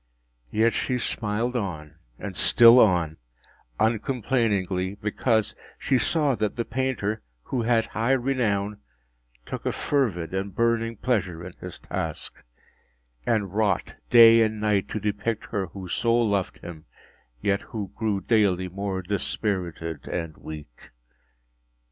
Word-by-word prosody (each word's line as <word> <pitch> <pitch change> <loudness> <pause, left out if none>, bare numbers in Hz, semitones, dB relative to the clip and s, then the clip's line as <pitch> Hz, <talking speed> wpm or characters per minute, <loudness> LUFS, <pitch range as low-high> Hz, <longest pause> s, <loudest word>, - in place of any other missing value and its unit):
Yet 115 - +2
she 125 - 0
smiled 115 +1 -1
on 80 -9 -4 0.2
and - - -6
still 120 +1 +7
on, 85 -8 +3 0.6
uncomplainingly, 105 -5 0
because 110 +1 0 0.2
she 130 -2 +1
saw 150 -2 +2
that 105 -2 -1
the 115 - -2
painter 120 -4 -2 0.2
(who 130 - -2
had 115 -1 +2
high 115 +5 0
renown) 110 -6 0 0.7
took - - -6
a - - 0
fervid 95 - -1
and 95 0 -3
burning 115 0 +1
pleasure 95 -10 -1
in 90 - -7
his - - -7
task, - - -5 0.8
and 105 -5 0
wrought 105 -4 0 0.2
day 115 -1 +8
and 110 -1 +1
night 105 -2 +1
to 110 - -3
depict 105 +2 -2
her 100 -4 -1
who 95 +2 -9
so 115 +6 +1
loved 100 -5 0
him, 80 -3 -9 0.5
yet 100 +8 +1
who 100 -4 -6
grew 105 -4 -1
daily 100 -5 +2
more 95 0 -3
dispirited 90 - -3
and 80 -3 -4
weak. 75 -6 -10
105 Hz, 130 wpm, -25 LUFS, 95-115 Hz, 0.8 s, day